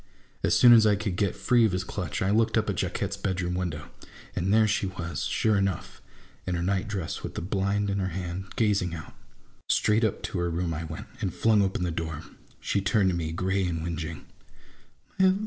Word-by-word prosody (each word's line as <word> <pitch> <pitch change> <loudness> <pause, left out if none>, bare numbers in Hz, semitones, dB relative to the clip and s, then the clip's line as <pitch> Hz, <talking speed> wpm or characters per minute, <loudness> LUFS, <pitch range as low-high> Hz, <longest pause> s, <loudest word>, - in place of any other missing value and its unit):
As - - +3
soon 120 -1 +8
as 110 -2 +7
I 105 - +4
could 100 -2 -3
get 100 -1 0
free 120 -2 +3
of 110 -4 +3
his 90 0 -1
clutch, 95 -4 -3
I 95 - +1
looked 110 +1 +2
up - - +1
at - - -4
Jacquette's 100 0 -2
bedroom 90 -3 -2
window, 85 -5 -4 0.4
and 90 +2 0
there 110 +1 +5
she 105 -2 0
was, 85 -2 -4
sure 110 -2 +2
enough! 100 -3 -2 0.5
in 90 - 0
her 85 - -1
nightdress, 95 -2 -2
with - - -6
the - - -3
blind 100 +2 0
in 100 0 -1
her 95 - 0
hand, 95 +1 -5
gazing 100 -6 +1
out. 80 - -9 0.6
Straight 105 +2 +3
up 110 - 0
to 90 - -3
her 85 0 0
room 85 0 -1
I 80 +2 -4
went, 80 0 -7
and 100 -6 -1
flung 110 +3 +3
open 95 -2 0
the 90 - -1
door. 80 -2 -4 0.4
She 100 - 0
turned 100 -1 +2
to - - -2
me 80 -2 -2
gray 95 +3 0
and 80 -2 -2
whingeing. 80 -2 -5
95 Hz, 205 wpm, -27 LUFS, 85-100 Hz, 0.6 s, soon